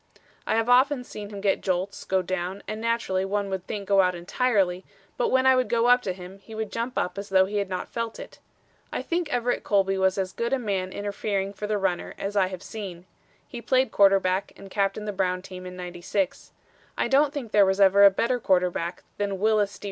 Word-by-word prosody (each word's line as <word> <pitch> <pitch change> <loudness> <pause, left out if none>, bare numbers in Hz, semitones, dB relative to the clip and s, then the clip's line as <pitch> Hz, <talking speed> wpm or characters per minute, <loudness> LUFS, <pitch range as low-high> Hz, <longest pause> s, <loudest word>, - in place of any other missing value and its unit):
I - - +2
have 225 +1 +1
often 255 +2 +4
seen 210 -4 -8
him 200 -1 -7
get 195 -1 +1
jolts, 185 +1 -2
go 190 -1 +1
down, 185 +2 -3
and 215 +1 -4
naturally 230 -5 0
one 200 0 -2
would 190 -1 -4
think 200 -2 -5
go 195 -1 +5
out 180 -1 +1
entirely, 190 0 0 0.3
but 245 - 0
when 260 0 +3
I 260 0 +6
would 255 -4 +1
go 235 0 +2
up 245 +1 +5
to 190 - -2
him, 185 +1 -11
he 220 +3 -12
would 220 -1 -4
jump 235 +2 -3
up 180 - -1
as 200 +1 -7
though 190 -1 +5
he 205 +2 -3
had 200 -2 -1
not 185 -1 -3
felt 230 -1 -4
it. - - -10 0.5
I - - -3
think 340 -2 -2
Everett 245 -1 0
Colby 195 -2 +1
was 190 0 +2
as 190 -1 -2
good 235 +2 -2
a - - +3
man 195 -6 -2
interfering 200 -1 -3
for 210 +1 -5
the 210 0 0
runner 190 -3 -2
as 200 +1 -4
I 195 -2 +3
have 185 -1 -7
seen. 185 -5 -7 0.4
He 240 - -8
played 260 +2 +2
quarterback 195 -1 +3
and 195 -1 -12
captained 200 +1 -1
the 205 - -2
Brown 185 -1 -1
team 185 -1 -9
in 180 - -8
'96. 180 +1 -3 0.5
I - - +1
don't 280 +1 +4
think 275 -7 -6
there 205 - +6
was 190 0 +1
ever 200 0 +6
a 200 - +10
better 235 +6 0
quarterback 180 -3 0 0.2
than 200 -1 -1
Wyllys 210 0 +1
D. - - -23
200 Hz, 225 wpm, -26 LUFS, 190-225 Hz, 0.5 s, a